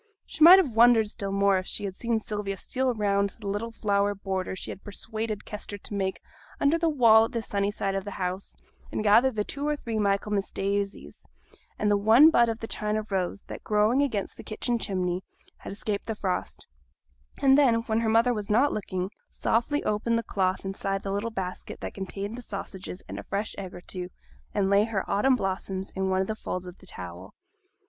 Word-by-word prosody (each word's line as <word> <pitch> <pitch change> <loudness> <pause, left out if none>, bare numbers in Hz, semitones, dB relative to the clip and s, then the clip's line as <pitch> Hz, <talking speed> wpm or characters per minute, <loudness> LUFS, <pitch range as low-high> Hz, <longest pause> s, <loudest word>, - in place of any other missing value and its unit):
She 310 - 0
might 355 +4 +11
have 350 -10 +2
wondered 230 -1 +6
still 200 -1 -4
more, 200 -1 +3
if 185 - -8
she 205 - -2
had 190 -2 -4
seen 230 0 0
Sylvia 205 -2 -4
steal 260 +6 -1
round 200 -1 +1
to - - -19
the 215 - -12
little 205 +4 -2
flower 205 -2 +1
border 190 -1 -3
she - - -5
had 195 - -10
persuaded 215 0 -5
Kester 205 -1 -6
to 205 - -7
make 190 -1 -2 0.4
under 300 +4 +3
the 335 -1 +2
wall 230 -6 +6
at - - -8
the 230 -2 -2
sunny 200 -1 0
side 200 -1 -2
of 195 0 -2
the 205 - -6
house, 185 +1 -4 0.4
and - - -2
gather 215 +5 +6
the 215 -5 -2
two 285 +6 -4
or 300 - +1
three 230 -6 -4
Michaelmas 200 0 0
daisies, 200 - -3 0.5
and 210 0 +1
the 205 - +4
one 225 +10 +7
bud 235 -5 +4
of 225 - -2
the 225 - -6
China 215 0 -2
rose, 190 +1 -1
that, - - -9
growing 215 +5 +3
against 225 -9 -2
the - - -9
kitchen 235 +2 -2
chimney, 185 -3 -1 0.3
had - - -8
escaped 200 +1 -3
the 225 - -2
frost; 190 -3 -3 0.7
and 270 -1 +5
then, 240 -5 +4
when 220 -1 0
her 230 -1 0
mother 230 +3 +4
was 210 -3 -4
not 250 +7 +4
looking, 185 -2 -3 0.2
softly 240 +6 0
open 215 +2 0
the 230 - 0
cloth 190 -2 -1
inside 195 0 -2
of 195 - -3
the 195 - -3
little 205 +3 -1
basket 190 -4 -5
that - - -6
contained 195 +2 -5
the 245 - -7
sausages 195 -4 -7
and - - -6
a - - -7
fresh 205 +1 -3
egg 190 -2 -6
or 175 - -9
two, 180 0 -5 0.4
and 200 -2 +1
lay 200 +2 +4
her 215 -4 -2
autumn 255 +7 +3
blossoms 190 -2 -3
in 190 0 -1
one 190 0 +2
of 190 - -1
the 220 - -2
folds 185 -3 -5
of 180 +1 -10
the 190 - -15
towel. 90 - -8
205 Hz, 215 wpm, -27 LUFS, 195-230 Hz, 0.7 s, might